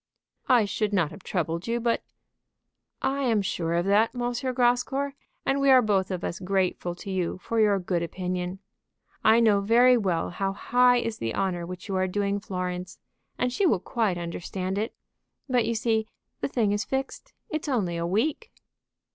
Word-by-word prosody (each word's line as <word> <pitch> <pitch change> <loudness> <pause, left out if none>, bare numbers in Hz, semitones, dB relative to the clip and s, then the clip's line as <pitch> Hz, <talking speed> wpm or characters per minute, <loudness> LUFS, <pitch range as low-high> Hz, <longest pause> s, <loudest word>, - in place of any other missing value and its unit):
"I 245 -4 +5
should 205 +1 -1
not 170 -6 +2
have 200 - -11
troubled 170 0 -2
you, 235 +1 0
but 235 0 +1 0.6
" - - -55
"I 270 +1 0
am 225 -6 +2
sure 170 -4 -1
of 170 +1 +1
that, 210 +5 +3
M. - - -5 0.3
Grascour; 250 +3 +1 0.3
and 275 +1 +1
we 275 - +4
are 260 -2 +7
both 195 -3 +1
of 185 -2 -4
us 170 - -3
grateful 185 -2 -1
to 195 +2 -7
you 180 -2 -1
for 225 +4 -2
your 210 -2 +4
good 180 -2 -1
opinion. 180 +1 -3 0.7
I 220 +1 +6
know 215 -4 +4
very 240 +4 +5
well 185 -8 0
how 195 +2 -2
high 245 +4 +4
is 230 -2 -2
the 115 0 -2
honor 175 -3 -1
which 180 +2 -8
you 195 - -2
are 185 0 +1
doing 200 +1 -1
Florence, 180 -2 -4 0.4
and 250 0 0
she 385 +7 +2
will 210 - +3
quite 200 -1 -1
understand 185 +3 -4
it. 220 +3 -3 0.5
But 245 -4 +2
you 230 - 0
see 220 -1 0 0.3
the - - -1
thing 230 -6 +1
is 205 +1 0
fixed; 270 0 -4 0.2
it's 310 -1 -3
only 200 -10 0
a 170 0 -2
week." 285 - -1
205 Hz, 185 wpm, -26 LUFS, 180-240 Hz, 0.7 s, are